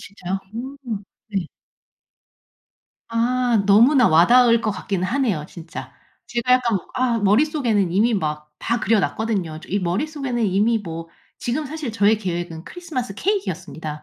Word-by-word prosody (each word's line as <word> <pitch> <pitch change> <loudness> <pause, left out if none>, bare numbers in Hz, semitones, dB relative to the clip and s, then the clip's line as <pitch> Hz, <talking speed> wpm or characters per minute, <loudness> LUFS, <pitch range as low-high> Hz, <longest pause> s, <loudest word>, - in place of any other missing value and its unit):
진짜요? 195 -1 -5 0.2
음. 255 -4 -5 0.3
네. 195 -6 -2 1.6
아. 235 -1 +1
너무나 240 +6 +6
와 165 +2 +6
닿을 240 -1 +6
것 220 - 0
같기는 185 -1 -3
하네요, 225 - 0
진짜. 140 -6 -9 0.3
제가 240 +1 0
약간 240 -5 +3 0.2
아 250 -2 +1
머릿속에는 220 - +2
이미 220 +5 +3
막 150 -5 -2
다 235 0 0
그려 220 +1 +3
놨거든요. 190 -7 -2
이 200 - 0
머릿속에는 245 - -1
이미 210 +4 +2
뭐 165 -4 -7 0.3
지금 255 +6 -2
사실 295 -4 -5
저의 215 0 +3
계획은 175 -4 -4
크리스마스 300 - -5
케이크였습니다. 180 - -3
220 Hz, 305 characters per minute, -22 LUFS, 185-250 Hz, 1.6 s, 너무나